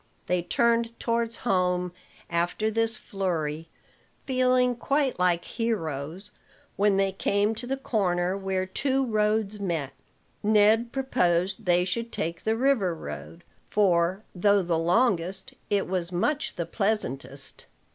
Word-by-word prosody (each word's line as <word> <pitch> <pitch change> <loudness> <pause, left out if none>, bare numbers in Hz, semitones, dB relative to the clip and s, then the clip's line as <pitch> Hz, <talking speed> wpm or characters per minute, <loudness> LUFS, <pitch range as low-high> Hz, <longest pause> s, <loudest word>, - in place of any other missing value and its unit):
They 180 -1 +1
turned 235 +4 +1
towards 230 0 0
home 180 -3 +1 0.3
after 175 +6 0
this 225 +1 0
flurry, 165 -8 -3 0.6
feeling 255 -1 +3
quite 275 0 0
like 175 -1 +2
heroes. 185 - -3 0.4
When 205 -1 +3
they 195 0 +2
came 200 +2 +1
to 235 +3 -6
the 270 +1 -1
corner 185 -8 0
where 190 -1 -1
two 265 +7 0
roads 215 -2 +1
met, 165 -8 -2 0.5
Ned 215 +2 +4
proposed 195 -7 0
they 180 0 +3
should 230 +5 -3
take 165 +1 -3
the 220 0 +2
river 235 -9 +2
road; 165 +1 -8 0.3
for, 185 -1 +2
though 200 +2 +3
the 170 -2 0
longest, 185 0 +1 0.2
it 200 -1 +1
was 180 -1 -2
much 290 - -1
the 170 - -2
pleasantest. 140 - -2
195 Hz, 125 wpm, -27 LUFS, 175-230 Hz, 0.6 s, Ned